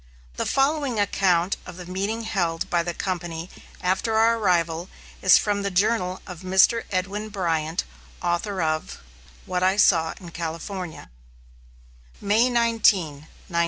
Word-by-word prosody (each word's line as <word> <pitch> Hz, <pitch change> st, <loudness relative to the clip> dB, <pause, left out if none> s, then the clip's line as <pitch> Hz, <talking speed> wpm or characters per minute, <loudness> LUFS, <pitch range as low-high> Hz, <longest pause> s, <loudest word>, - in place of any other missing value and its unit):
The -, -, -1 dB
following 275 Hz, -4 st, +1 dB
account 185 Hz, -3 st, +2 dB
of 180 Hz, -, -9 dB
the 180 Hz, -, -8 dB
meeting 200 Hz, +5 st, -3 dB
held 175 Hz, -4 st, -1 dB
by 175 Hz, -, +3 dB
the 170 Hz, 0 st, -4 dB
company 175 Hz, -2 st, -4 dB, 0.3 s
after 190 Hz, +5 st, 0 dB
our 225 Hz, +1 st, +4 dB
arrival 170 Hz, -3 st, +1 dB, 0.3 s
is 185 Hz, -, +7 dB
from 205 Hz, -1 st, 0 dB
the 200 Hz, -, -1 dB
journal 190 Hz, -1 st, 0 dB
of 180 Hz, -4 st, -8 dB
Mr. 190 Hz, +5 st, +3 dB
Edwin 200 Hz, +3 st, -2 dB
Bryant, 165 Hz, -4 st, -1 dB, 0.4 s
author 175 Hz, +2 st, -1 dB
of 155 Hz, 0 st, -2 dB, 0.5 s
"What 180 Hz, 0 st, -2 dB
I 190 Hz, +2 st, +3 dB
Saw 165 Hz, -6 st, +4 dB
in 175 Hz, -3 st, -10 dB
California": 165 Hz, -, -6 dB, 1.1 s
May 220 Hz, +5 st, +3 dB
19, 210 Hz, -, +2 dB, 0.3 s
1846. -, -, 0 dB
185 Hz, 135 wpm, -24 LUFS, 170-210 Hz, 1.1 s, is